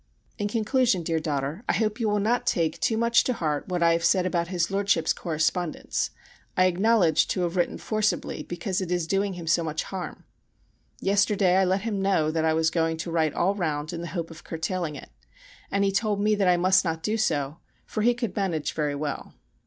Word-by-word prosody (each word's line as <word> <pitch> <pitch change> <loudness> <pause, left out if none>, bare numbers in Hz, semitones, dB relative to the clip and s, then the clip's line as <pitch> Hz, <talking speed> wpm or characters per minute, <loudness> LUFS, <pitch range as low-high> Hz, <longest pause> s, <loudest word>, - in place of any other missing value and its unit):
In 205 - 0
conclusion, 225 -2 +1
dear 165 0 0
daughter, 150 - -3
I - - +4
hope 215 +1 0
you 225 -2 +1
will 210 - +1
not 240 +4 0
take 165 -7 +1
too 225 - +1
much 235 +1 +4
to 255 - +1
heart 155 -8 -2
what 175 -1 0
I 170 - +5
have 165 0 0
said 185 +1 +3
about 175 -2 0
his 175 0 -1
Lordship's 195 -5 +2
correspondence, 160 +1 -1 0.5
I 185 - +5
acknowledge 185 -3 +3
to 185 - -1
have 175 0 -1
written 175 - 0
forcibly 215 -1 -1
because 180 +2 -3
it 180 -2 -4
is 175 -2 0
doing 195 +3 0
him 175 -2 -7
so 165 +1 +2
much 155 -1 -2
harm. 190 -2 -6 0.8
Yesterday 200 -2 +3
I 190 - +4
let 190 +2 +1
him 205 -2 -2
know 185 -6 +2
that 160 0 0
I 160 0 +2
was 160 0 +2
going 165 -1 0
to 165 +1 -5
write 160 -3 +1
all 190 +3 +2
round 155 -6 -2
in 170 - -4
the 170 - -5
hope 165 -1 -3
of 165 - -12
curtailing 165 -1 -3
it, - - -11 0.6
and 200 0 +1
he 195 - +2
told 205 +1 0
me 210 +1 +2
that 200 -2 +1
I 180 -1 +5
must 185 +2 +4
not 165 -2 -3
do 215 - 0
so, 145 -8 -1 0.3
for 215 - -3
he 240 +2 +3
could 235 -6 -4
manage 180 -7 -1
very 150 -2 -1
well. 145 0 -5
180 Hz, 215 wpm, -26 LUFS, 160-205 Hz, 0.8 s, I